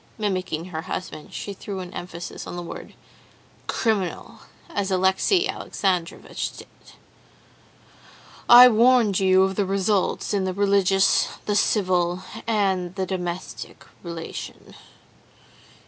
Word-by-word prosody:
'" - - -32
(Mimicking 185 -6 -2
her 160 -3 -4
husband, 160 -3 -6
she 200 - -6
threw 195 0 -7
an 180 -1 -8
emphasis 175 -1 -7
on - - -6
the 175 - -5
word 170 - -9 0.7
"criminal," 220 0 -2 0.3
as 200 -1 -1
Alexey 190 - +2
Alexandrovitch 180 -4 -3
did.) - - -11 1.8
"'I 245 +1 +11
warned 230 -3 +4
you 190 0 +4
of 190 0 0
the 205 - +2
results 195 +1 0
in 200 -2 +1
the 185 -1 -2
religious, 195 -1 +3 0.2
the 205 - 0
civil, 185 -4 +1 0.2
and 190 -5 0
the 190 -1 -1
domestic 180 -1 -6 0.2
relation. 170 -2 -8
190 Hz, 115 wpm, -24 LUFS, 180-205 Hz, 1.8 s, I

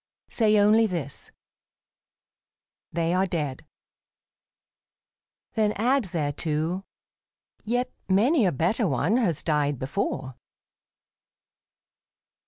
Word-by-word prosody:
Say 215 -2 +3
only 215 +2 +5
this, 165 -8 -5 0.8
" - - -68
They 165 +1 0
are 190 +1 +2
dead." 150 -5 -4 1.9
Then 215 -2 +1
add 250 +3 +1
thereto, 160 +2 -2 0.4
" - - -45
Yet 250 +1 0 0.2
many 225 - +4
a - - +2
better 190 - +1
one 155 - +1
has 175 - 0
died 145 -3 +1
before." 130 -2 -3
180 Hz, 90 wpm, -26 LUFS, 150-215 Hz, 1.9 s, only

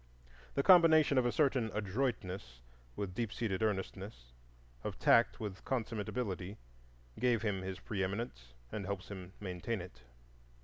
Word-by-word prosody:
The 140 - +2
combination 160 -6 +7
of 120 - +2
a - - +2
certain 130 -6 +2
adroitness 100 - -2 0.4
with 100 -3 -3
deep 115 +1 -2
seated 105 -5 -2
earnestness, 95 - -3 0.5
of - - -4
tact 115 - +4
with 100 -4 -5
consummate 115 -5 -2
ability, 100 -5 -3 0.6
gave 120 -2 +2
him 100 -4 0
his 95 0 -5
preeminence, 95 - -3 0.2
and 100 -3 -4
helps 100 -1 -4
him 95 -2 -8
maintain 100 +3 -3
it. 90 -7 -10
105 Hz, 135 wpm, -34 LUFS, 95-120 Hz, 0.6 s, combination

